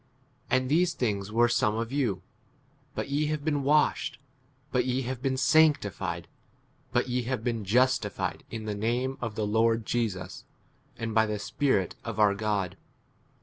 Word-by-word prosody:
And 130 0 +2
these 170 +5 +2
things 105 -4 -1
were 120 +2 +4
some 110 -3 +2
of 115 +1 -3
you; 120 -10 0 0.7
but - - -3
ye 145 +2 +1
have 150 -1 -2
been 145 -3 +1
washed, 145 -2 +2 0.5
but 125 -1 +2
ye 130 +1 -1
have 125 0 -4
been 130 -1 0
sanctified, 100 - +2 0.6
but 120 +1 +1
ye 125 0 0
have 130 -4 -2
been 115 -3 -1
justified 120 0 +1
in 110 -1 -6
the 105 - -2
name 120 +6 -1
of 115 -3 -3
the 110 - -1
Lord 115 +1 +2
Jesus, 110 -6 -2 0.5
and 115 -1 -3
by 110 0 +4
the 105 0 -2
Spirit 100 -2 0
of 115 -2 -5
our 105 -2 +5
God. 100 -3 -1
115 Hz, 160 wpm, -28 LUFS, 105-130 Hz, 0.7 s, our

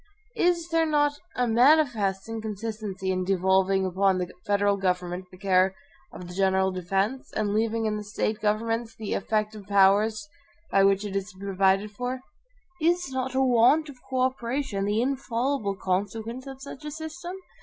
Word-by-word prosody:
Is 345 -1 +2
there 330 -1 +2
not 290 -1 +2 0.2
a 250 - +1
manifest 230 -6 +3
inconsistency 215 -3 -4
in 185 0 0
devolving 190 +1 +2
upon 190 +1 +2
the 180 -1 -3 0.2
federal 205 0 +3
government 180 -1 -2
the 185 - -14
care 190 0 +2 0.4
of 180 - -9
the 180 - -9
general 190 0 +2
defense, 195 +7 -2
and 210 -2 0
leaving 225 +1 0
in 215 -1 0
the 210 - -5
State 210 +1 -2
governments 225 +2 -1
the 215 -2 -4
EFFECTIVE 215 -2 -2
powers 200 +2 +3 0.4
by 195 - +4
which 195 +1 +3
it 200 -1 -5
is 195 +1 -2
to - - -20
be 200 - -8
provided 195 +1 +2
for? 250 +4 -4 0.6
Is 345 -2 +1
not 260 0 -3
a 265 - +3
want 260 +5 +4
of 260 -3 -12
co 260 -1 0
operation 255 -4 -1
the 210 +3 +1
infallible 255 -4 -1
consequence 220 +7 -3
of 270 0 -9
such 280 +1 -9
a 300 - -4
system? 320 +4 -7
215 Hz, 165 wpm, -26 LUFS, 195-255 Hz, 0.6 s, by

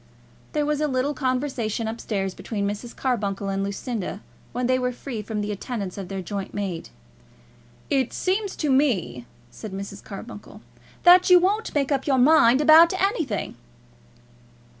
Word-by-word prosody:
There 300 -2 +1
was 300 0 -1
a 305 - +2
little 265 +1 0
conversation 255 -5 -2
up 225 +1 -5
stairs 195 -3 -2
between 200 -1 -3
Mrs. 210 +4 -5
Carbuncle 200 -6 -2
and 195 0 -1
Lucinda, 200 0 -4 0.3
when 250 +1 -2
they 255 +1 +2
were 250 0 0
free 245 -2 -6
from 210 0 -4
the 205 0 -3
attendance 205 -2 -5
of 195 -2 -6
their 195 -1 -5
joint 195 +1 -5
maid. 195 -5 -4 1.0
"It 270 -4 +1
seems 390 +2 -1
to 300 -3 -1
me," 215 - +1 0.2
said 210 - -9
Mrs. 200 +1 -7
Carbuncle, 210 +1 -10 0.4
"that 360 +1 +7
you 360 - +9
won't 400 +4 0
make 285 0 +1
up 275 0 0
your 270 -2 +3
mind 260 -1 +5
about 330 +4 +7
anything." 325 - -1
245 Hz, 160 wpm, -24 LUFS, 200-290 Hz, 1.0 s, you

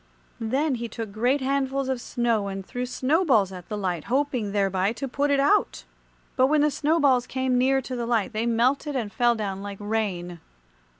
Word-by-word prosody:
Then 265 +6 0
he 235 - -2
took 225 -1 -6
great 245 +7 +1
handfuls 270 0 0
of 260 -2 -2
snow 230 -5 0
and 195 -1 -5
threw 250 +4 -4
snowballs 255 - +2
at 180 -2 -10
the 210 - -3
light, 180 -5 -2
hoping 255 -5 0
thereby 195 0 +1
to 275 +3 -5
put 285 +3 -1
it 280 -1 +3
out. 405 +10 +2 0.5
But 260 0 +4
when 300 +1 +3
the 300 0 +3
snowballs 285 -4 +2
came 260 -1 -1
near 265 +1 +2
to 255 - -5
the 235 -1 -3
light 235 0 0
they 220 +2 -1
melted 255 +5 +1
and 225 -5 -3
fell 240 -1 +3
down 195 -3 -4
like 200 0 -6
rain. 200 -5 -3
240 Hz, 190 wpm, -25 LUFS, 205-270 Hz, 0.5 s, But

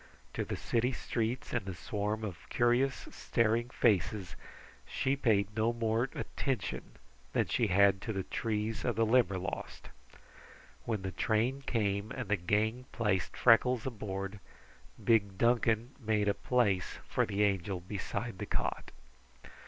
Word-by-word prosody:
To - - -1
the - - -4
city 120 +2 0
streets 120 +1 -2
and 120 -4 0
the 95 - -4
swarm 105 +5 -2
of 95 -6 -7
curious, 120 +3 +2
staring 115 +1 +1
faces 95 -6 +1 0.5
she 135 - 0
paid 105 -6 +1
no 110 +2 +2
more 115 +2 0
attention 130 -9 -3 0.4
than - - +2
she 115 - +1
had 100 0 +4
to 110 - -3
the 95 -3 -2
trees 110 +1 -2
of 120 -3 0
the 115 +1 +3
Limberlost. 95 -5 0 1.0
When 110 -4 -2
the 95 - -3
train 115 +8 0
came 100 -2 0
and - - -5
the 105 - +4
gang 105 +7 0
placed 105 -6 0
Freckles 125 0 +5
aboard, 100 -4 -4 0.6
big 100 -4 +3
Duncan 115 +1 +2
made 110 -3 +1
a 100 - +4
place 105 -8 +1
for - - +1
the 105 0 +1
Angel 95 -2 0
beside 100 +3 -4
the 105 - -4
cot. - - -2
110 Hz, 140 wpm, -32 LUFS, 100-120 Hz, 1.0 s, Freckles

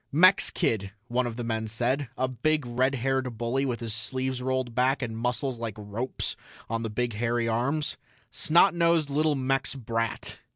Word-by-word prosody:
"Mex 185 +6 +6
kid," 100 -3 -1 0.2
one 125 +1 +1
of 115 - -5
the 120 - -4
men 110 -1 -2
said, 120 +5 -1
a 130 - +1
big 150 +3 0
red 130 +3 +1
haired 130 -1 -1
bully 125 +4 0
with 120 -2 -3
his 115 -2 -2
sleeves 130 +4 -1
rolled 130 -2 -1
back 130 +3 +2
and 115 -2 -3
muscles 125 +2 -1
like 115 -3 -4
ropes 105 +5 -3 0.3
on 115 0 -2
the 115 - -3
big 120 +2 -1
hairy 115 +2 0
arms. 130 +7 0 0.3
"Snot 170 +4 +4
nosed 170 -3 +2
little 150 +1 +2
Mex 135 +1 0
brat." 115 -3 -3
125 Hz, 175 wpm, -27 LUFS, 115-135 Hz, 0.3 s, Mex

